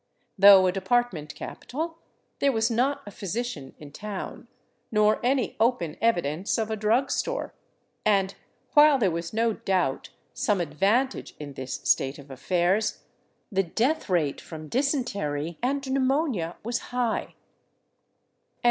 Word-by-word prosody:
Though 195 -2 +8
a 185 - +3
de 195 +1 -4
partment 190 -8 0
capital, 325 +5 -6 0.4
there 280 - +3
was 225 -1 +1
not 255 +5 +1
a 205 - -8
physician 195 - -5
in 145 -2 -11
town, 205 +4 -6 0.4
nor 210 -1 +3
any 255 0 +1
open 220 -9 +1
evi 225 -6 +3
dence 155 +8 -1
of 220 -1 -1
a - - 0
drug 225 +6 +1
store; - - -2 0.5
and 195 -2 +2 0.4
while 295 -1 +7
there 200 -8 +2
was 170 +1 -4
no 225 +1 +1
doubt 180 -10 -1 0.2
some 205 -3 +1
advantage 195 - 0
in 145 -2 -7
this 130 -1 -5
state 135 +1 +2
of 140 -1 -13
affairs, 180 - 0 0.5
the 195 -1 +2
death 235 - 0
rate 160 -6 +1
from 155 -2 -9
dysentery 200 - -1
and 275 +2 -1
pneumonia 265 - 0
was 235 +2 -1
high. 245 -2 -2
210 Hz, 140 wpm, -26 LUFS, 170-245 Hz, 0.5 s, Though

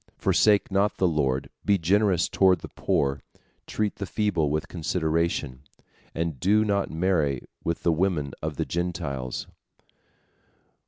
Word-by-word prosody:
Forsake 105 -2 +3
not 100 +2 +1
the 95 - +3
Lord, 70 -5 0
be 100 -1 +3
generous 95 +1 +2
toward 95 -4 +3
the - - -8
poor, 70 0 0 0.5
treat 105 -1 -2
the 100 - -4
feeble 95 -9 0
with 75 +1 -1
consideration, 80 -5 -1 0.5
and 80 -4 -2
do 105 - +3
not 100 -1 0
marry 80 -6 0 0.2
with 85 - -2
the 85 - +3
women 80 -5 0
of 75 0 -3
the - - -2
Gentiles." 85 -8 -3
85 Hz, 130 wpm, -26 LUFS, 75-95 Hz, 0.5 s, Forsake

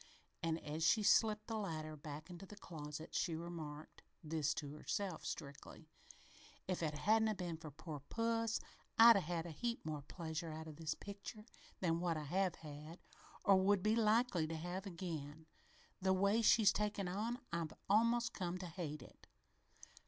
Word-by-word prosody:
And 165 0 0
as 155 +2 -2
she 210 +6 +5
slipped 215 0 +4
the 225 -1 -2
ladder 155 -6 -3
back 150 +2 -8
into 180 +2 -9
the 210 - -10
closet, 155 -5 -7
she 170 -3 +1
remarked 160 -3 -7 0.2
this 155 -1 0
to 145 -2 -4
herself, 185 +3 -3
strictly: 140 -1 -7 0.8
"If 185 -2 -1
it 155 -2 0
hadn't 220 +7 +4
'a' 215 - +1
been 175 -3 -3
for 160 -1 -8
poor 150 +1 -7
puss, 230 -1 +1 0.4
I'd 230 0 +10
'a' - - +5
had 170 -1 -2
a 170 - -5
heap 235 +7 -3
more 155 -2 -3
pleasure 160 +1 -5
out 160 +1 -6
o' - - -6
this 155 0 -3
picture 205 +2 -8 0.4
than 165 -2 +2
what 170 -2 0
I 155 - -3
have 180 +4 +1
had 155 +2 -9 0.5
or 195 -1 +7
will 200 +2 +4
be 215 +4 +2
likely 220 -6 +3
to 165 - -3
have 180 +4 -4
again. 160 -4 -5 0.6
The 190 0 +4
way 200 +4 +3
she's 215 -2 +6
taken 210 -2 -1
on, 215 +6 -1 0.2
I've 170 -2 -1
almost 230 +3 +3
come 180 -2 -2
to 185 - -6
hate 160 -5 -5
it!" - - -17
175 Hz, 175 wpm, -39 LUFS, 155-205 Hz, 0.8 s, I'd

